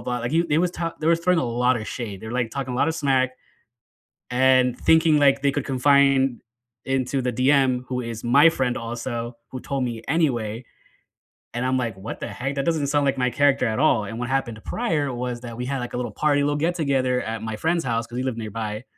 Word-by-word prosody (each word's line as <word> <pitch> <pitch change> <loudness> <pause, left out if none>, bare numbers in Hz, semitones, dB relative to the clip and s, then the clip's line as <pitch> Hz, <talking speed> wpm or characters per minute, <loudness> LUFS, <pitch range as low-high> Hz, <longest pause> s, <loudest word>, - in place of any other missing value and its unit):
blah. 125 +1 -3
Like, 120 +3 -4
you 170 +1 +2
they 150 0 +2
was 175 0 +1
ta 165 -2 -4
they 155 - -2
was 170 0 +3
throwing 180 0 +2
a - - +1
lotta 120 -1 +1
shade. 105 -5 -6
They're, 110 +1 -7
like, 120 -2 -1
talking 130 -1 -4
a - - -3
lotta 160 +5 +2
smack 135 -4 +1 1.0
and 130 0 +3
thinking, 160 -2 +4
like, 140 -1 +4
they 140 -1 +2
could 145 -2 -2
confine 135 -1 +3 0.4
into 135 0 -1
the 125 0 -1
DM, 130 0 +2
who 125 -1 -3
is 115 -2 -6
my 140 +7 +6
friend 130 -6 0
also- 120 0 -5
who 130 - -6
told 135 -1 -2
me 115 -2 -4
anyway- 125 -8 0 0.9
and 125 +1 -1
I'm 130 0 +1
like, 115 -6 -3
"What 95 +4 -7
the - - -4
heck? 135 +3 -4
That 140 - -1
doesn't 160 -4 0
sound 145 0 +1
like 135 -1 +1
my 125 -1 +1
character 140 -3 +2
at 110 +1 -1
all," 135 -7 +3
and 115 +4 -6
what 125 0 -3
happened 125 -5 -2
prior 155 - -1
was 120 -1 -4
that 120 -2 -8
we 125 - -4
had, 135 +1 -2
like, 120 0 -6
a - - -2
little 120 -3 -3
party, 145 +3 +1
little 145 0 +1
get 165 +4 0
together 130 -6 +1
at 110 0 -4
my 110 -1 -4
friend's 165 +6 0
house- 115 -2 -1
'cause 120 +1 -8
he - - -1
lived 130 -3 -2
nearby- 110 0 -5
130 Hz, 230 wpm, -23 LUFS, 120-140 Hz, 1.0 s, my